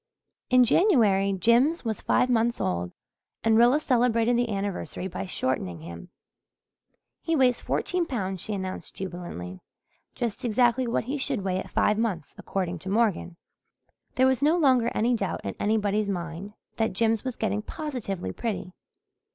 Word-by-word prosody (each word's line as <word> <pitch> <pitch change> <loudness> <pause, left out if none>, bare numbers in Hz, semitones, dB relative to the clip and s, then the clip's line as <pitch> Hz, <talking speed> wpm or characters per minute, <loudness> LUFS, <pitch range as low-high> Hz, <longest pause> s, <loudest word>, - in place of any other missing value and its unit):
In 255 0 +6
January 220 - +4
Jims 235 - +3
was 220 -3 -2
five 250 - +2
months 235 -1 +1
old 90 -1 -2 0.5
and 225 -1 +4
Rilla 240 +5 +5
celebrated 245 -4 +2
the 240 0 +1
anniversary 195 -2 -3
by 195 +1 -5
shortening 95 - -2
him. 85 +1 -9 1.1
"He 330 - 0
weighs 255 -4 +3
fourteen 360 -2 -1
pounds," 190 - -3
she 215 - -2
announced 190 -1 -6
jubilantly. 175 - -7 0.5
"Just 235 +1 -3
exactly 240 +2 +2
what 235 - 0
he 275 +5 -3
should 265 -6 -1
weigh 185 -1 -1
at - - -7
five 210 +1 +2
months, 190 -10 -2
according 180 -3 -3
to 190 - -7
Morgan." 200 -5 0 0.8
There 260 - +4
was 260 0 +2
no 310 +4 +4
longer 255 -7 +3
any 235 +3 +2
doubt 200 -5 -2
in 100 - -3
anybody's 210 -1 +1
mind 175 +2 -5 0.2
that 220 -3 0
Jims 225 +2 +1
was 255 -2 -4
getting 210 -1 -1
positively 230 - -5
pretty. 190 - -4
220 Hz, 150 wpm, -26 LUFS, 190-245 Hz, 1.1 s, In